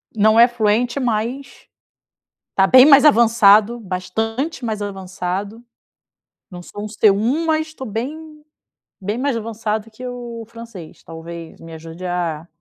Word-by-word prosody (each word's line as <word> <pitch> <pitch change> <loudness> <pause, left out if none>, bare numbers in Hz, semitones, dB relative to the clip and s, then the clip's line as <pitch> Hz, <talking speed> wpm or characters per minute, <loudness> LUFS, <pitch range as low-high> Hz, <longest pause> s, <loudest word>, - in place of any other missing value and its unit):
não 220 +1 +4
é 235 - +8
fluente, 240 +2 0
mas 245 +3 -3 0.9
está 195 0 +2
bem 255 +1 +8
mais 285 0 +7
avançado, 230 -3 +5
bastante 225 - -4
mais 215 -2 -3
avançado, 195 +2 -5 0.9
não 175 -1 -9
sou 205 +3 -9
um - - -5
C1 220 +9 +1
mas 315 0 0
estou 265 -5 -9
bem 300 +8 -7 0.6
bem 205 +3 -3
mais 270 -2 -1
avançado 220 -1 -4
que 235 +4 -12
o 240 -2 -7
francês 230 -8 -12
talvez 165 0 -10
me 165 0 -12
ajude 165 +3 -10
a 170 -3 -3
220 Hz, 135 wpm, -19 LUFS, 195-245 Hz, 0.9 s, é